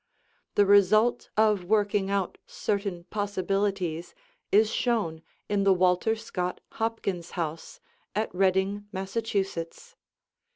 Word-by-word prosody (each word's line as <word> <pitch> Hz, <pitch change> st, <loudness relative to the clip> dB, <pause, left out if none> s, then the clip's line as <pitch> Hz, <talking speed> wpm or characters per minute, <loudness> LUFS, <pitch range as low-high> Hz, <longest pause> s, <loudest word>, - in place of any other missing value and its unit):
The 205 Hz, -, +5 dB
result 205 Hz, +4 st, +4 dB
of 210 Hz, -4 st, +3 dB
working 205 Hz, 0 st, +1 dB
out 200 Hz, -2 st, -1 dB
certain 200 Hz, -4 st, -2 dB
possibilities 195 Hz, -, -1 dB, 0.4 s
is 215 Hz, +2 st, +5 dB
shown 205 Hz, -10 st, 0 dB, 0.3 s
in 205 Hz, -1 st, +1 dB
the 195 Hz, -1 st, +5 dB
Walter 180 Hz, +4 st, +2 dB
Scott 180 Hz, -5 st, -4 dB, 0.2 s
Hopkins 195 Hz, -6 st, -2 dB
house 165 Hz, -, -4 dB, 0.4 s
at 215 Hz, +1 st, -1 dB
Reading, 190 Hz, +2 st, +1 dB
Massachusetts. 195 Hz, -, -3 dB
200 Hz, 100 wpm, -27 LUFS, 180-215 Hz, 0.4 s, The